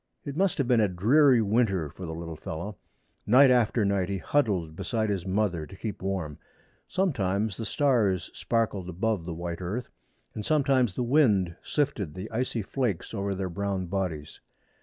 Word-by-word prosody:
It 140 Hz, -2 st, -5 dB
must 190 Hz, +2 st, +1 dB
have 140 Hz, -, 0 dB
been 120 Hz, -3 st, +4 dB
a 105 Hz, -, +4 dB
dreary 120 Hz, -, +4 dB
winter 100 Hz, -6 st, +1 dB
for 90 Hz, +3 st, -8 dB
the 80 Hz, -, -5 dB
little 85 Hz, 0 st, -6 dB
fellow. 85 Hz, +7 st, -6 dB, 0.5 s
Night 130 Hz, +4 st, +7 dB
after 115 Hz, -3 st, +3 dB
night 100 Hz, -2 st, +1 dB
he 100 Hz, -, -1 dB
huddled 95 Hz, -, 0 dB
beside 110 Hz, +3 st, -1 dB
his 95 Hz, -2 st, -3 dB
mother 95 Hz, -5 st, 0 dB
to 85 Hz, -, -12 dB
keep 105 Hz, +1 st, -5 dB
warm. 95 Hz, -6 st, -3 dB, 0.5 s
Sometimes 110 Hz, -, 0 dB
the 115 Hz, +1 st, -4 dB
stars 115 Hz, -, +1 dB
sparkled 105 Hz, -6 st, -1 dB
above 95 Hz, 0 st, -1 dB
the 85 Hz, -2 st, -5 dB
white 85 Hz, +1 st, -5 dB
earth, 100 Hz, +8 st, -4 dB, 0.4 s
and 105 Hz, -, -5 dB
sometimes 135 Hz, -7 st, +2 dB
the 125 Hz, -, -1 dB
wind 110 Hz, -, +3 dB
sifted 125 Hz, -, -1 dB
the 95 Hz, +4 st, -7 dB
icy 115 Hz, -1 st, -1 dB
flakes 115 Hz, -5 st, -2 dB
over 100 Hz, -2 st, -2 dB
their 95 Hz, 0 st, -2 dB
brown 95 Hz, +1 st, -2 dB
bodies. 85 Hz, -5 st, -4 dB
100 Hz, 170 wpm, -27 LUFS, 90-120 Hz, 0.5 s, Night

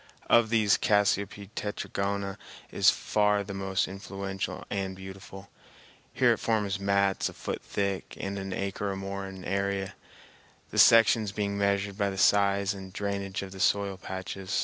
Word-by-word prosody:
Of 115 Hz, -2 st, +6 dB
these, 110 Hz, -3 st, +3 dB
Cassiope 100 Hz, -1 st, +1 dB
tetragona 100 Hz, -1 st, -3 dB, 0.3 s
is -, -, +5 dB
far 105 Hz, -1 st, +2 dB
the 100 Hz, 0 st, -7 dB
most 95 Hz, -1 st, -1 dB
influential 95 Hz, 0 st, -5 dB
and 95 Hz, -1 st, -2 dB
beautiful. 95 Hz, +1 st, -10 dB, 0.6 s
Here -, -, +4 dB
it -, -, -5 dB
forms 105 Hz, -3 st, 0 dB
mats 100 Hz, 0 st, +1 dB
a -, -, -11 dB
foot -, -, -5 dB
thick 100 Hz, -1 st, -3 dB
and 100 Hz, 0 st, -3 dB
an 95 Hz, 0 st, -5 dB
acre 100 Hz, +1 st, -2 dB
or 95 Hz, -, -2 dB
more 95 Hz, 0 st, -5 dB
in 95 Hz, -1 st, -9 dB
area, 100 Hz, 0 st, -1 dB, 0.8 s
the -, -, 0 dB
sections 115 Hz, -2 st, +6 dB
being 100 Hz, 0 st, -2 dB
measured 100 Hz, 0 st, 0 dB
by 100 Hz, -1 st, +2 dB
the 95 Hz, -, -6 dB
size 100 Hz, 0 st, +3 dB
and 95 Hz, -1 st, -9 dB
drainage 100 Hz, -1 st, -3 dB
of 95 Hz, -, -8 dB
the 95 Hz, -, -10 dB
soil 100 Hz, 0 st, +2 dB
patches. 95 Hz, +2 st, -4 dB
100 Hz, 155 wpm, -28 LUFS, 95-100 Hz, 0.8 s, Of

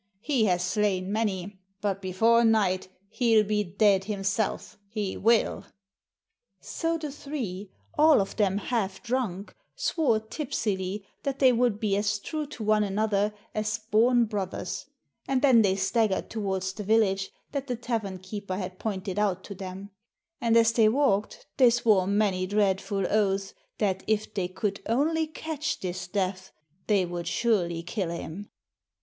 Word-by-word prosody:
He 260 Hz, -4 st, +2 dB
has 180 Hz, -3 st, +2 dB
slain 190 Hz, -1 st, 0 dB
many, 205 Hz, -3 st, -2 dB, 0.2 s
but 200 Hz, -2 st, -2 dB
before 225 Hz, +5 st, +3 dB
night 205 Hz, -5 st, +2 dB, 0.2 s
he 235 Hz, -2 st, +2 dB
'11 215 Hz, -1 st, +5 dB
be 210 Hz, 0 st, +1 dB
dead 195 Hz, 0 st, +2 dB
himself, 205 Hz, +1 st, -2 dB
he 210 Hz, -3 st, -3 dB
will." 230 Hz, +1 st, +2 dB, 1.0 s
So 330 Hz, 0 st, -2 dB
the 305 Hz, -3 st, -5 dB
three, 235 Hz, -10 st, -5 dB, 0.3 s
all 310 Hz, -3 st, +7 dB
of 195 Hz, -, -2 dB
them 200 Hz, -3 st, +2 dB
half 200 Hz, -3 st, -2 dB
drunk, 230 Hz, -6 st, -2 dB, 0.2 s
swore 310 Hz, -, +1 dB
tipsily 210 Hz, -6 st, -3 dB, 0.2 s
that 275 Hz, -2 st, -2 dB
they 260 Hz, -2 st, +5 dB
would 235 Hz, -3 st, +1 dB
be 210 Hz, -3 st, +1 dB
as 205 Hz, 0 st, +1 dB
true 305 Hz, +8 st, -4 dB
to 250 Hz, -6 st, -7 dB
one 215 Hz, 0 st, +3 dB
another 205 Hz, 0 st, +1 dB, 0.2 s
as 215 Hz, +1 st, -1 dB
born 240 Hz, +2 st, +4 dB
brothers, 200 Hz, -4 st, -4 dB, 0.4 s
and 270 Hz, 0 st, 0 dB
then 255 Hz, -5 st, +7 dB
they 195 Hz, -3 st, +3 dB
staggered 200 Hz, +1 st, 0 dB
toward 195 Hz, -4 st, -2 dB
the 190 Hz, +3 st, -4 dB
vil 220 Hz, +3 st, +4 dB
lage 195 Hz, -2 st, 0 dB, 0.2 s
that 280 Hz, -1 st, -3 dB
the 250 Hz, -, -1 dB
tavern 225 Hz, -5 st, -3 dB
keeper 190 Hz, 0 st, -5 dB
had 185 Hz, -1 st, -5 dB
pointed 195 Hz, -2 st, -3 dB
out 190 Hz, -3 st, 0 dB
to 200 Hz, -, -7 dB
them; 190 Hz, +1 st, -8 dB, 0.5 s
and 230 Hz, -1 st, +4 dB
as 230 Hz, 0 st, +5 dB
they 225 Hz, -2 st, +5 dB
walked 215 Hz, -5 st, +1 dB
they 255 Hz, -3 st, +7 dB
swore 220 Hz, -6 st, +3 dB
many 200 Hz, -2 st, +1 dB
dreadful 195 Hz, -1 st, +1 dB
oaths 195 Hz, -2 st, +1 dB, 0.2 s
that 190 Hz, -3 st, 0 dB
if 215 Hz, 0 st, 0 dB
they 190 Hz, -3 st, -1 dB
could 200 Hz, +2 st, -3 dB
only 315 Hz, +7 st, +1 dB
catch 310 Hz, 0 st, -4 dB
this 180 Hz, -1 st, -4 dB
Death, 185 Hz, 0 st, -2 dB, 0.4 s
they 200 Hz, -4 st, +3 dB
would 175 Hz, -1 st, -5 dB
surely 175 Hz, -6 st, 0 dB
kill 190 Hz, -1 st, -3 dB
him. 170 Hz, +4 st, -6 dB
210 Hz, 155 wpm, -27 LUFS, 190-230 Hz, 1.0 s, all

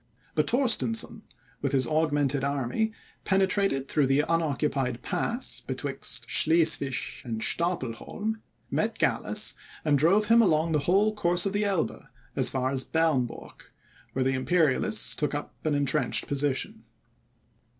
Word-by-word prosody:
But -, -, 0 dB
Torstensohn, 230 Hz, -3 st, +2 dB, 0.4 s
with 140 Hz, 0 st, -2 dB
his 130 Hz, -2 st, +3 dB
augmented 145 Hz, -2 st, 0 dB
army, 140 Hz, -, -1 dB, 0.3 s
penetrated 190 Hz, -7 st, +1 dB
through 145 Hz, -2 st, +1 dB
the 135 Hz, +2 st, +3 dB
unoccupied 145 Hz, -6 st, -1 dB
pass 240 Hz, +3 st, -2 dB
betwixt 130 Hz, -3 st, -3 dB
Schleswig 145 Hz, -4 st, +2 dB
and 115 Hz, -3 st, -4 dB
Stapelholm, 175 Hz, -, -2 dB, 0.3 s
met -, -, -1 dB
Gallas, -, -, +1 dB, 0.3 s
and 145 Hz, -2 st, +3 dB
drove 190 Hz, +8 st, +3 dB
him 230 Hz, +2 st, +5 dB
along 165 Hz, -5 st, +2 dB
the 155 Hz, -, +2 dB
whole 205 Hz, +4 st, +3 dB
course 175 Hz, -3 st, +1 dB
of 195 Hz, -, -1 dB
the 205 Hz, +1 st, 0 dB
Elbe, 195 Hz, -5 st, -1 dB, 0.3 s
as -, -, +3 dB
far 130 Hz, 0 st, -1 dB
as 135 Hz, -1 st, 0 dB
Bernburg, 155 Hz, -7 st, -2 dB, 0.4 s
where 130 Hz, 0 st, -1 dB
the 135 Hz, -, +1 dB
Imperialists 145 Hz, +1 st, +2 dB
took -, -, -2 dB
up -, -, -6 dB
an 155 Hz, -2 st, +1 dB
entrenched 140 Hz, -2 st, 0 dB
position. 140 Hz, -5 st, -1 dB
150 Hz, 130 wpm, -27 LUFS, 135-190 Hz, 0.4 s, him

